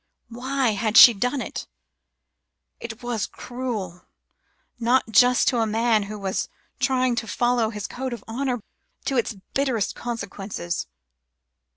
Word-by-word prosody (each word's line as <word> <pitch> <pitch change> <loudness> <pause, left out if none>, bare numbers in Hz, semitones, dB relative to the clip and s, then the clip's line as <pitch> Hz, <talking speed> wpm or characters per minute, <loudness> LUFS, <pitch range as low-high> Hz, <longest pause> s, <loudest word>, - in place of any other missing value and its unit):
Why 260 +2 0
had 215 +2 +1
she 240 - +11
done 250 +6 -1
it? - - -6 1.1
It 235 0 -8
was 240 -4 -2
cruel, 225 -8 -5 0.8
not 240 0 +2
just 245 +4 +5
to 245 - 0
a 225 - +2
man 225 0 +2
who 215 - -5
was 195 -2 -2 0.3
trying 255 -1 +2
to 225 - -2
follow 240 -1 +1
his 210 -3 -5
code 260 +1 -4
of 235 -4 -6
honour, 245 +1 -2 0.4
to 270 - 0
its 235 -1 0 0.2
bitterest 260 -7 0
consequences." 200 -6 -5
235 Hz, 135 wpm, -24 LUFS, 215-250 Hz, 1.1 s, she